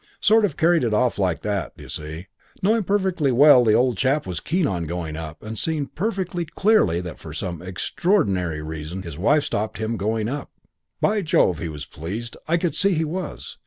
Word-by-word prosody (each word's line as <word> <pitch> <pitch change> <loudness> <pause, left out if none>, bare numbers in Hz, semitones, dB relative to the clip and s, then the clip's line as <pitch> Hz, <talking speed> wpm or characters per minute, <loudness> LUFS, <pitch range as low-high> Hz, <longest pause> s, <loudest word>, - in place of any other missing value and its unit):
"Sort 220 +1 +4
of 170 -8 -4
carried 170 -1 +3
it 115 -3 +1
off 125 -1 +1
like 90 -6 0
that, 100 -4 -3
d'you - - -11
see; 80 +3 -6 0.4
knowing 220 +4 +3
perfectly 185 -7 +1
well 130 0 +7
the 110 -2 +4
old 125 -3 +2
chap 135 +5 +1
was 90 -2 -4
keen 175 0 0
on 90 - -1
going 80 -1 -4
up, 80 -1 -7
and 110 0 -6
seeing 155 -3 -1
perfectly 185 0 -2
clearly 170 - +2
that 90 -3 -8
for - - -9
some 85 -3 -4
extraordinary 95 - 0
reason 80 +4 -6
his 85 -3 -8
wife 145 +10 +3
stopped 110 +1 -2
him 110 +1 -2
going 110 +2 -1
up. 140 +4 -4 0.5
"By 210 0 +2
Jove, 160 - +2
he 85 - -3
was 75 -2 -7
pleased, 105 +10 -6
I 170 +2 +3
could 170 -1 -1
see 200 -2 +3
he 160 0 +1
was. 180 +5 -5
115 Hz, 200 wpm, -23 LUFS, -, 0.5 s, well